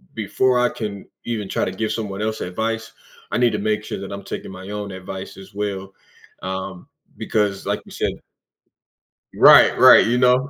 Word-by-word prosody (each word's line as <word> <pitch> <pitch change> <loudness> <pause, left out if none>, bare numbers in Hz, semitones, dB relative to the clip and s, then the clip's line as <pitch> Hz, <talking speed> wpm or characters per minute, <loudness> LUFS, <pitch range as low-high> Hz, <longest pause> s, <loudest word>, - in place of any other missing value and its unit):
before 125 +4 +1
I 125 - +3
can 100 -3 -6 0.2
even 110 -4 -3
try - - 0
to 95 - -3
give 110 +3 -3
someone 105 -2 -4
else 110 0 -2
advice, 115 +4 -3 0.4
I 105 - 0
need 120 -1 +3
to 105 - -2
make 110 +1 -1
sure - - -5
that 100 0 -7
I'm 100 0 -7
taking - - -7
my 95 +1 -10
own 105 -1 -5
advice 95 0 -8
as 95 0 -13
well," 95 -1 -4 0.5
um, 95 -1 -5 0.3
because 105 -2 -1
like - - -1
you - - -15
said - - -2 1.2
Right, - - +7
right, - - +8
you 120 +2 +1
know? 125 +2 +3
105 Hz, 185 wpm, -21 LUFS, 95-115 Hz, 1.2 s, right